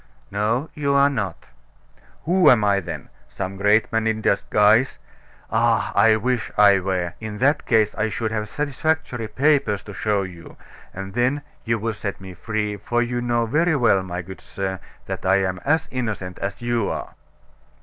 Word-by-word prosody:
"No, 110 +8 -1
you 140 -2 0
are 140 +1 +5
not." 100 - -4 0.8
"Who 180 +4 +4
am 115 -4 +5
I 100 -1 +3
then? 95 - -7 0.2
Some 95 +1 -5
great 105 +4 +2
man 115 0 +1
in 110 -1 0
disguise? 105 +4 +3 0.5
Ah! - - +2
I 110 +2 +5
wish 120 +2 -1
I 100 -2 +6
were! 90 -2 -2
In 110 -1 -6
that 145 +6 +1
case, 110 -3 +3
I 110 +1 -1
should 110 +1 -3
have 105 -1 -3
satisfactory 145 -4 -2
papers 135 -6 +1
to 105 - -9
show 100 0 0
you; 85 -3 -10 0.3
and 95 +1 -7
then 130 +4 +1 0.2
you 115 0 +1
would 110 -1 -3
set 100 -2 -4
me 95 -1 -9
free, 105 +2 -3
for 120 +4 0
you 120 0 -2
know 120 -1 +1
very 160 +8 +2
well, 115 -8 +3
my 90 -1 -5
good 95 +2 -10
sir, 95 -1 -4 0.3
that - - -5
I 95 +1 +3
am 90 -1 -2
as 160 +3 +2
innocent 105 -8 -4
as 100 +4 -4
you 120 -3 0
are." - - -5
110 Hz, 175 wpm, -22 LUFS, 100-125 Hz, 0.8 s, I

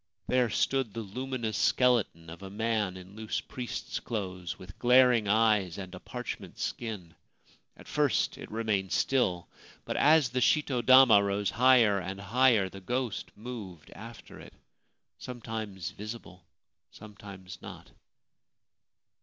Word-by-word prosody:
There 125 -2 +2
stood 130 -1 0
the 115 - -3
luminous 120 +1 -4
skeleton 110 -10 +2
of 85 - -11
a 95 - -8
man 105 -2 -1
in 95 +2 -13
loose 110 0 -3
priest's 125 -4 -6
clothes, 90 -6 -5
with 95 0 -13
glaring 125 -3 +5
eyes 105 -4 +2
and 95 -2 -8
a 90 - -8
parchment 125 +4 -7
skin! 105 -8 -5 0.6
At - - -15
first - - +1
it - - -9
remained 105 -4 -1
still; 95 -10 +1 0.4
but - - -3
as 150 -2 +5
the 125 +1 -1
shito 135 -5 +2
dama 130 -5 +7
rose 100 0 -1
higher 120 -4 +4
and 95 +2 -6
higher 110 0 +3
the 95 +1 -11
ghost 125 +2 -3
moved 105 -8 -9
after 115 +1 -11
it - - -13 0.4
— - - -53
sometimes 110 -7 -6
visible, 100 -3 -9 0.4
sometimes 100 -4 -12
not. - - -11
110 Hz, 135 wpm, -29 LUFS, 95-125 Hz, 0.6 s, dama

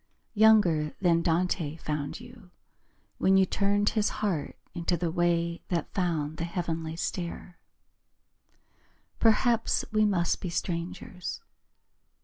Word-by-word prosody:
Younger 205 -9 +4
than 170 -3 +3
Dante 165 -2 0
found 150 -1 -4
you 240 -5 -14 0.7
When 190 0 +4
you 190 - +5
turned 205 +2 +1
His 215 -2 +1
heart 190 -9 -2 0.2
into 170 0 0
the 165 0 -1
way 170 -1 0
That 170 -4 -2
found 160 -5 -1
the 165 - -3
heavenly 165 -2 -3
stair. 175 +1 -5 1.6
Perhaps 225 +1 +3
we 215 0 +3
must 175 -5 +1
be 180 - -3
strangers. 175 +1 -4
175 Hz, 115 wpm, -28 LUFS, 165-200 Hz, 1.6 s, you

